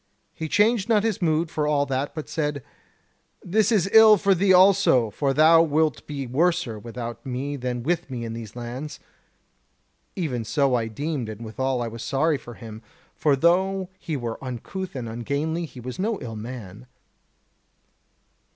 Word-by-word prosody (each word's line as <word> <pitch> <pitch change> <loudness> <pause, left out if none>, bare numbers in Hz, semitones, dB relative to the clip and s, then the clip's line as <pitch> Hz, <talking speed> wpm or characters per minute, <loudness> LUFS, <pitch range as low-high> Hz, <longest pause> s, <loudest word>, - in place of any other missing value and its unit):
He 160 -1 -5
changed 210 +3 +2
not 215 -2 +4
his 225 -4 -1
mood 160 -1 +1
for 150 -1 -1
all 145 -1 +2
that; 135 +1 -3
but 155 - -5
said: 150 -3 -2 0.8
'This 215 +4 +2
is 195 -4 +2
ill 220 -1 +9
for 200 +1 +3
thee 190 +2 +2
also; 185 - +5
for 140 +5 0
thou 160 +3 +6
wilt 155 -6 0
be 140 -2 -4
worser 145 -3 0
without 115 +1 -7
me 135 +3 -3
than 125 -2 -3
with 165 +1 -1
me 120 -3 -5
in 115 - -5
these 115 -2 -8
lands.' 125 +5 -6 1.2
Even 145 - -2
so 140 +3 +1
I 115 -2 +1
deemed, 135 +1 -3
and 110 +2 -7
withal 125 +3 -1
I - - -3
was 115 0 -8
sorry 145 +3 +1
for 120 -2 -11
him, 110 -1 -10 0.3
for 145 -2 +2
though 185 +5 +2
he 155 -3 -3
were 120 0 -5
uncouth 145 +9 -6
and 125 -3 -4
ungainly, 140 +9 -2
he 130 - -12
was 125 +7 -7
no 215 +2 -1
ill 115 -2 -7
man. 110 -1 -8
140 Hz, 170 wpm, -24 LUFS, 120-170 Hz, 1.2 s, ill